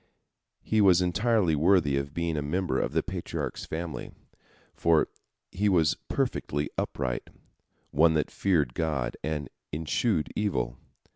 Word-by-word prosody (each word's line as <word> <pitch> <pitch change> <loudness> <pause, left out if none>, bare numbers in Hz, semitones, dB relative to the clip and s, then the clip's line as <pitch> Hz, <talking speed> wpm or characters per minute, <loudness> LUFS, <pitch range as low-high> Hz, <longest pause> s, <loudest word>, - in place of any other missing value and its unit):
He 110 -1 +2
was 95 -3 +6
entirely 90 -1 +2
worthy 75 -2 +3
of 70 +1 -2
being 85 -1 -1
a 75 - 0
member 90 +6 0
of - - -1
the - - +2
Patriarch's - - -4
family, 80 0 -5 0.6
for 80 -2 +3 0.4
he 105 +2 +1
was 85 -5 +3
perfectly 75 0 -1
upright, 65 -3 -2 0.6
one 80 +2 +4
that 75 - 0
feared 80 -11 +1
God, 75 -6 -1
and 75 -3 -2 0.2
eschewed 80 +4 0
evil. 65 - -1
80 Hz, 130 wpm, -28 LUFS, 75-90 Hz, 0.6 s, was